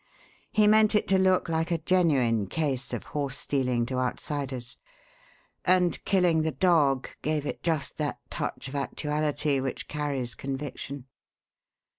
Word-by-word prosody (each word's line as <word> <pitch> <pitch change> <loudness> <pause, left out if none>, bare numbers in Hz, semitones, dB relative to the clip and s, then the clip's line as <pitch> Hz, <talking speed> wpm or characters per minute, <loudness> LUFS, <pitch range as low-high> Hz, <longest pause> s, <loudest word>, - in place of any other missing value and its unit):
He 215 - +4
meant 215 0 +5
it 210 - +2
to 190 -1 +4
look 185 -1 +3
like 165 +1 0
a 170 - +1
genuine 140 - +2
case 135 - -2
of - - -3
horse 140 -2 -3
stealing 125 -5 0
to 130 +1 -2
outsiders, 130 -1 -3 0.8
and 180 -1 +2
killing 180 -4 +3
the 160 - +1
dog 150 -8 +3
gave 150 -1 -1
it - - -4
just 155 -6 -1
that - - -2
touch - - -4
of 135 - -8
actuality 150 0 0
which 130 0 -4
carries 140 -5 -3
conviction. 135 0 -5
150 Hz, 140 wpm, -27 LUFS, 135-170 Hz, 0.8 s, meant